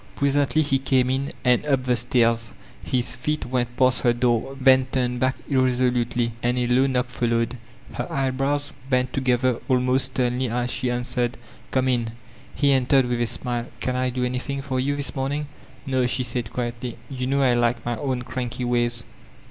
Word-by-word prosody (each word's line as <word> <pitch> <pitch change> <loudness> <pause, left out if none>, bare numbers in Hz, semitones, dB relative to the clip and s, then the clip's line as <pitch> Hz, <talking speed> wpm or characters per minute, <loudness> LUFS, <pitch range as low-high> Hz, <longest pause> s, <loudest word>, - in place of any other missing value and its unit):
Presently 140 +2 +2
he 135 -2 +1
came 130 -1 +2
in 135 +1 -1 0.2
and 125 -1 +4
up 135 -3 +2
the 125 -1 +2
stain. 120 -1 +3 0.5
His 125 -1 0
feet 150 +5 -2
went 120 -1 -2
past 130 -1 +3
her 120 - +3
door, 120 +2 0
then 130 -1 +5
turned 125 -1 0
back 130 +1 +1
irresolutely, 125 -3 +1
and 120 +1 0
a 125 - +1
low 125 +3 +3
knock 125 -1 +1
followed. 115 0 0 0.4
Her - - -4
eyebrows 135 +2 -1 0.2
bent 125 -1 +1
together 130 -2 +1
almost 130 +1 +2
sternly 125 -1 -1
as 125 +1 -1
she 125 +1 -1
answered, 120 0 -1 0.3
''Come 130 0 +1
in." 120 -3 0 0.4
He 140 -1 +3
entered 135 0 +4
with 120 -1 -1
a 120 - +2
smile: 120 0 -2
''Can 125 - -1
I 130 0 +1
do 125 0 -1
anything 130 +2 -3
for 130 -2 -2
you, 140 +2 0
tliis 140 -3 -1
morning?" 140 +3 -1 0.4
"No," 130 -3 +1
she 130 +1 -1
said 120 -3 -3
quietly, 120 0 -4
"you 130 -2 -4
know 140 +1 +2
I 125 -2 +4
like 120 0 +1
my 120 0 -1
own 130 -3 -2
cranky 125 -1 -4
ways. 120 -1 +3
125 Hz, 180 wpm, -24 LUFS, 120-130 Hz, 0.5 s, then